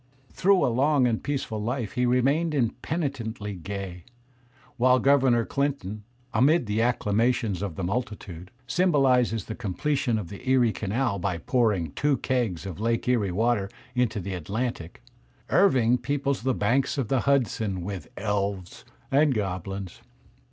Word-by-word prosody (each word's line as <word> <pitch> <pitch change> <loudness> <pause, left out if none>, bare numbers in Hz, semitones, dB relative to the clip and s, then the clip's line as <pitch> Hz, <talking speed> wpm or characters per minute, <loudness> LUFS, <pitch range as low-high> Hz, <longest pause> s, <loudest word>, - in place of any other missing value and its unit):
Through 195 0 +3
a 120 - +1
long 140 +1 +3
and 115 -2 0
peaceful 130 -6 -3
life 115 -1 -2
he 125 0 0
remains 140 +6 +2
im 120 -5 +2
penitently 120 -10 -3
gay. 95 -2 -6 0.7
While 125 +1 +5
Governor 130 -3 +3
Clinton, 135 -8 -2 0.3
"amid 135 +6 +4
the 105 +1 -1
accla 115 -3 +1
mations 115 -4 +1
of 100 -6 -4
the 95 - -4
multitude," 95 -4 -4 0.2
symbolizes 130 - +2
the 110 - -5
completion 120 +4 -1
of 100 -6 -5
the 100 +6 -7
Erie 125 -3 +4
Canal 110 +1 -1
by 90 -1 -1
pouring 105 - +1
two 145 - +1
kegs 115 -10 -1
of 95 -2 -6
Lake 115 +1 0
Erie 110 -7 +2
water 105 0 +1 0.2
into 125 -4 0
the 95 +1 -5
Atlantic, 95 0 -4 0.5
Irving 125 - +4
peoples 140 +2 -1
the 130 +1 0
banks 135 +4 +1
of 135 -5 -1
the 130 +3 +1
Hudson 115 -9 0
with 95 -4 -6
elves 100 -3 -2 0.3
and 140 -1 +4
goblins. 95 -1 -4
115 Hz, 145 wpm, -26 LUFS, 100-130 Hz, 0.7 s, While